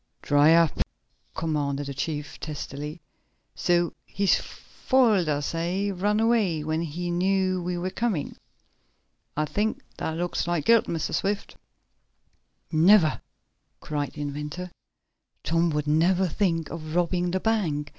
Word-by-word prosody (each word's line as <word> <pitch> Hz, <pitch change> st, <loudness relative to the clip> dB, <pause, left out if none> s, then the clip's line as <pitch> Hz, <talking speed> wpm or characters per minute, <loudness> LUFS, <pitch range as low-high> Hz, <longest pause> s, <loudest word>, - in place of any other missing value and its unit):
"Dry 145 Hz, +3 st, +5 dB
up!" 165 Hz, -2 st, +3 dB, 0.6 s
commanded 145 Hz, -3 st, -1 dB
the 140 Hz, -, -5 dB
chief 145 Hz, +1 st, -4 dB
testily. 150 Hz, +1 st, -6 dB, 0.5 s
"So 175 Hz, -1 st, +1 dB
he's 200 Hz, -1 st, +1 dB
foiled 225 Hz, -, +1 dB
us, 145 Hz, +1 st, -1 dB
eh? 180 Hz, +5 st, -1 dB
Run 205 Hz, +3 st, +1 dB
away 220 Hz, -9 st, +2 dB
when 155 Hz, +1 st, -1 dB
he 170 Hz, +2 st, -3 dB
knew 185 Hz, +1 st, +1 dB
we 175 Hz, 0 st, -2 dB
were 180 Hz, +2 st, -3 dB
coming? 205 Hz, -8 st, -2 dB, 1.0 s
I 155 Hz, -, +2 dB
think 210 Hz, +7 st, -1 dB
that 160 Hz, 0 st, -3 dB
looks 175 Hz, 0 st, -2 dB
like 175 Hz, -4 st, 0 dB
guilt, 230 Hz, -1 st, +5 dB
Mr. 165 Hz, -2 st, -3 dB
Swift." 200 Hz, +1 st, -1 dB, 1.2 s
"Never!" 165 Hz, 0 st, +5 dB, 0.6 s
cried 145 Hz, -2 st, -3 dB
the 150 Hz, -, -7 dB
inventor. 150 Hz, +5 st, -5 dB, 0.7 s
"Tom 165 Hz, +1 st, +2 dB
would 150 Hz, -1 st, -1 dB
never 175 Hz, +5 st, +3 dB
think 165 Hz, -3 st, 0 dB
of 155 Hz, -1 st, -6 dB
robbing 175 Hz, 0 st, +1 dB
the 190 Hz, +2 st, 0 dB
bank. 170 Hz, -10 st, 0 dB
170 Hz, 130 wpm, -26 LUFS, 150-190 Hz, 1.2 s, Dry